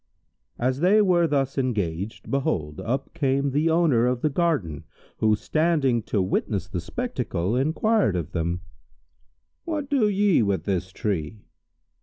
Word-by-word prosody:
As 130 Hz, +2 st, 0 dB
they 190 Hz, +6 st, +4 dB
were 180 Hz, -5 st, +4 dB
thus 135 Hz, -2 st, 0 dB
engaged, 100 Hz, -6 st, -3 dB
behold, 80 Hz, -, -1 dB
up 130 Hz, +4 st, -3 dB
came 140 Hz, -1 st, 0 dB
the 150 Hz, +4 st, +1 dB
owner 160 Hz, -8 st, +3 dB
of 125 Hz, -1 st, -1 dB
the 155 Hz, -, +1 dB
garden 140 Hz, -, -1 dB, 0.3 s
who, 110 Hz, -1 st, +3 dB
standing 150 Hz, -2 st, +1 dB
to 105 Hz, -, +1 dB
witness 95 Hz, +1 st, -1 dB
the 90 Hz, -2 st, -4 dB
spectacle, 115 Hz, -, -2 dB
enquired 160 Hz, -, +2 dB
of 85 Hz, -1 st, -3 dB
them, 85 Hz, +1 st, -2 dB, 1.0 s
"What 300 Hz, -4 st, -4 dB
do 245 Hz, -7 st, +3 dB
ye 200 Hz, -5 st, +3 dB
with 100 Hz, -6 st, 0 dB
this 95 Hz, -1 st, -2 dB
tree?" 100 Hz, 0 st, -3 dB
130 Hz, 140 wpm, -25 LUFS, -, 1.0 s, they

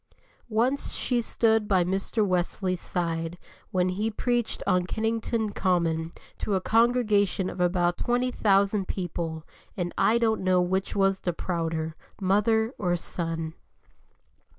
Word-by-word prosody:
Once 240 Hz, +6 st, 0 dB
she 245 Hz, -2 st, 0 dB
stood 220 Hz, -2 st, +2 dB
by 190 Hz, -3 st, +3 dB
Mr. 195 Hz, +4 st, 0 dB
Wesley's 185 Hz, 0 st, -1 dB
side 165 Hz, -1 st, -2 dB, 0.3 s
when 185 Hz, -1 st, +1 dB
he 205 Hz, +4 st, -1 dB
preached 240 Hz, +1 st, -1 dB
on 180 Hz, -1 st, +2 dB
Kennington 225 Hz, 0 st, -1 dB
Common 165 Hz, -4 st, 0 dB, 0.3 s
to 205 Hz, -, 0 dB
a -, -, +2 dB
congregation 215 Hz, -4 st, +2 dB
of 180 Hz, -, -5 dB
about 175 Hz, 0 st, +1 dB
20,000 210 Hz, -5 st, +2 dB
people, 165 Hz, -3 st, -4 dB, 0.3 s
and 175 Hz, -2 st, -2 dB
I 230 Hz, -, +4 dB
don't 225 Hz, -3 st, +1 dB
know 185 Hz, -1 st, +3 dB
which 190 Hz, +2 st, 0 dB
was 195 Hz, -1 st, +2 dB
the 175 Hz, -, -1 dB
prouder, 165 Hz, -2 st, -2 dB, 0.3 s
mother 220 Hz, +4 st, +2 dB
or 175 Hz, -3 st, +1 dB
son. 165 Hz, -2 st, -4 dB
190 Hz, 130 wpm, -27 LUFS, 175-220 Hz, 0.3 s, I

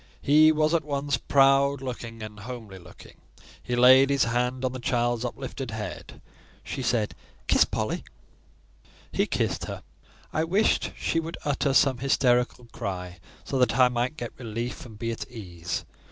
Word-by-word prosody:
He 155 Hz, +2 st, +6 dB
was 155 Hz, +1 st, +2 dB
at 165 Hz, -2 st, +2 dB
once 145 Hz, -1 st, -1 dB
proud 140 Hz, 0 st, +4 dB
looking 115 Hz, -3 st, -6 dB
and 105 Hz, -1 st, -8 dB
homely 110 Hz, -4 st, -8 dB
looking. 85 Hz, -, -15 dB, 0.4 s
He 125 Hz, -, -2 dB
laid 130 Hz, +2 st, +7 dB
his 140 Hz, -1 st, +3 dB
hand 125 Hz, +2 st, 0 dB
on 130 Hz, -, 0 dB
the 130 Hz, -, -6 dB
child's 120 Hz, -1 st, 0 dB
uplifted 130 Hz, +1 st, -5 dB
head. 105 Hz, -6 st, -7 dB, 0.4 s
She -, -, -5 dB
said—"Kiss 115 Hz, -3 st, 0 dB
Polly." -, -, -3 dB, 1.1 s
He -, -, +1 dB
kissed -, -, -1 dB
her. -, -, -7 dB, 0.5 s
I 155 Hz, -, +1 dB
wished 190 Hz, +7 st, +1 dB
she 165 Hz, -, 0 dB
would 165 Hz, +1 st, -5 dB
utter 145 Hz, -1 st, +1 dB
some 135 Hz, -4 st, +4 dB
hysterical 125 Hz, -2 st, +2 dB
cry, 90 Hz, -2 st, -5 dB, 0.2 s
so 135 Hz, -, -2 dB
that 125 Hz, -, +2 dB
I 125 Hz, -1 st, +6 dB
might 125 Hz, +5 st, -1 dB
get 120 Hz, -4 st, -5 dB
relief 120 Hz, +1 st, -5 dB
and 110 Hz, -3 st, -13 dB
be 115 Hz, +1 st, -2 dB
at 115 Hz, -, -6 dB
ease. 90 Hz, -7 st, -5 dB
125 Hz, 155 wpm, -26 LUFS, 115-140 Hz, 1.1 s, laid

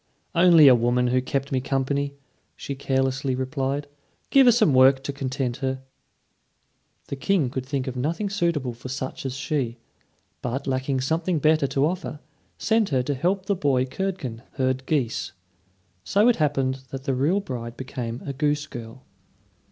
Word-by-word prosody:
"Only 170 Hz, -3 st, +7 dB
a 130 Hz, -, +9 dB
woman 120 Hz, +1 st, +2 dB
who 130 Hz, +1 st, +2 dB
kept 135 Hz, +2 st, -2 dB
me 130 Hz, -1 st, +1 dB
company," 140 Hz, +1 st, -1 dB, 0.4 s
she 140 Hz, -, -5 dB
carelessly 135 Hz, 0 st, 0 dB
replied. 135 Hz, +2 st, -2 dB, 0.5 s
"Give 270 Hz, -2 st, +6 dB
her -, -, +9 dB
some 215 Hz, -, +3 dB
work 130 Hz, +1 st, +5 dB
to 140 Hz, -, -3 dB
content 130 Hz, -2 st, -2 dB
her." 130 Hz, -1 st, -3 dB, 1.3 s
The -, -, -3 dB
King 145 Hz, -2 st, +1 dB
could 130 Hz, -1 st, -3 dB
think 135 Hz, -2 st, -2 dB
of 130 Hz, -, -4 dB
nothing 160 Hz, +11 st, -1 dB
suitable 170 Hz, -10 st, -1 dB
for 120 Hz, +2 st, -9 dB
such 130 Hz, 0 st, -4 dB
as 130 Hz, -, -5 dB
she; 135 Hz, -4 st, -2 dB, 0.6 s
but 130 Hz, +3 st, -3 dB
lacking 130 Hz, 0 st, -1 dB
something 165 Hz, +5 st, 0 dB
better 155 Hz, -1 st, +3 dB
to 135 Hz, +1 st, +1 dB
offer, 165 Hz, -3 st, -3 dB, 0.4 s
sent 220 Hz, -1 st, +2 dB
her 130 Hz, -4 st, +1 dB
to 145 Hz, -, -1 dB
help 185 Hz, +7 st, 0 dB
the 200 Hz, -, +1 dB
boy 140 Hz, -7 st, +1 dB
Curdken 135 Hz, -7 st, -4 dB
herd 130 Hz, 0 st, -1 dB
geese. 135 Hz, -7 st, -1 dB, 0.7 s
So 205 Hz, -, +3 dB
it 245 Hz, -, +4 dB
happened 135 Hz, -3 st, 0 dB
that 135 Hz, -1 st, -6 dB
the 135 Hz, -, 0 dB
real 145 Hz, +10 st, +2 dB
bride 120 Hz, -9 st, -6 dB
became 125 Hz, -3 st, -5 dB
a 140 Hz, -, -3 dB
goose 145 Hz, +2 st, 0 dB
girl. 120 Hz, -1 st, -9 dB
135 Hz, 165 wpm, -24 LUFS, 130-155 Hz, 1.3 s, a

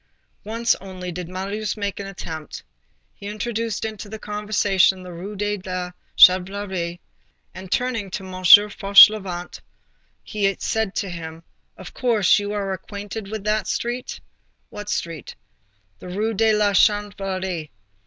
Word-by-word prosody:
Once 230 Hz, +2 st, +1 dB
only, 185 Hz, -2 st, -7 dB
did 175 Hz, 0 st, -6 dB
Marius 200 Hz, +4 st, -4 dB
make 200 Hz, -2 st, -3 dB
the 200 Hz, -1 st, -6 dB
attempt. 160 Hz, -5 st, -8 dB, 0.5 s
He 200 Hz, -, -10 dB
introduced 220 Hz, +1 st, -3 dB
into 215 Hz, -2 st, -6 dB
the 220 Hz, -, -6 dB
conversation 205 Hz, -3 st, +1 dB
the 180 Hz, -1 st, -9 dB
Rue 190 Hz, +5 st, -7 dB
de 205 Hz, +1 st, -1 dB
la 185 Hz, -1 st, -4 dB, 0.3 s
Chanvrerie, 185 Hz, -2 st, +4 dB, 0.5 s
and, 185 Hz, 0 st, -10 dB
turning 240 Hz, -5 st, -1 dB
to 190 Hz, +1 st, -5 dB
M. 185 Hz, -, -9 dB
Fauchelevent, 200 Hz, -1 st, +6 dB, 0.6 s
he 200 Hz, -2 st, 0 dB
said 220 Hz, -3 st, -2 dB
to 195 Hz, -, -2 dB
him: 165 Hz, -1 st, -8 dB, 0.3 s
"Of -, -, -11 dB
course, 225 Hz, -6 st, +3 dB
you 205 Hz, 0 st, -4 dB
are 200 Hz, -2 st, -2 dB
acquainted 200 Hz, +2 st, -7 dB
with 215 Hz, -1 st, -5 dB
that 215 Hz, 0 st, 0 dB
street?" 240 Hz, +1 st, -3 dB, 0.5 s
"What 210 Hz, 0 st, -7 dB
street?" 165 Hz, -, -4 dB, 0.6 s
"The -, -, -10 dB
Rue 215 Hz, +5 st, -1 dB
de 220 Hz, +2 st, +3 dB
la 210 Hz, -1 st, +2 dB
Chanvrerie." 195 Hz, -5 st, 0 dB
200 Hz, 135 wpm, -22 LUFS, 185-210 Hz, 0.6 s, Fauchelevent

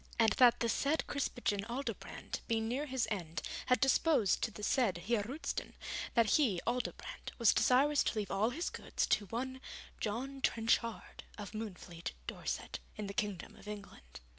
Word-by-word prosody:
And 225 Hz, -2 st, +5 dB
that 245 Hz, -2 st, +7 dB
the 235 Hz, -, +3 dB
said 285 Hz, +7 st, +1 dB
Krispijn 245 Hz, -7 st, -1 dB
Aldobrand, 255 Hz, +4 st, -4 dB
being 225 Hz, -1 st, +1 dB
near 270 Hz, +6 st, -1 dB
his 260 Hz, -3 st, 0 dB
end, 170 Hz, -5 st, -3 dB, 0.2 s
had 250 Hz, -, +4 dB
deposed 270 Hz, -, +4 dB
to -, -, +1 dB
the 210 Hz, -1 st, -10 dB
said 215 Hz, -5 st, +2 dB
Heer 210 Hz, +5 st, +1 dB
Roosten, 260 Hz, +10 st, -4 dB, 0.4 s
that 230 Hz, -2 st, +5 dB
he, 230 Hz, -, +3 dB
Aldobrand, 250 Hz, 0 st, -3 dB
was 235 Hz, -3 st, +6 dB
desirous 280 Hz, +3 st, +4 dB
to -, -, 0 dB
leave 210 Hz, -2 st, -2 dB
all 205 Hz, +4 st, +2 dB
his 335 Hz, +8 st, -2 dB
goods -, -, -1 dB
to 205 Hz, -, +2 dB
one 260 Hz, +5 st, -3 dB, 0.4 s
John 260 Hz, +6 st, -3 dB
Trenchard, 230 Hz, -1 st, 0 dB
of 205 Hz, -3 st, -6 dB
Moonfleet, 185 Hz, -6 st, -6 dB
Dorset, -, -, -4 dB, 0.2 s
in 215 Hz, -, -4 dB
the 200 Hz, -, -5 dB
Kingdom 205 Hz, -3 st, -2 dB
of -, -, -14 dB
England. 195 Hz, -, -9 dB
230 Hz, 165 wpm, -35 LUFS, 205-260 Hz, 0.4 s, that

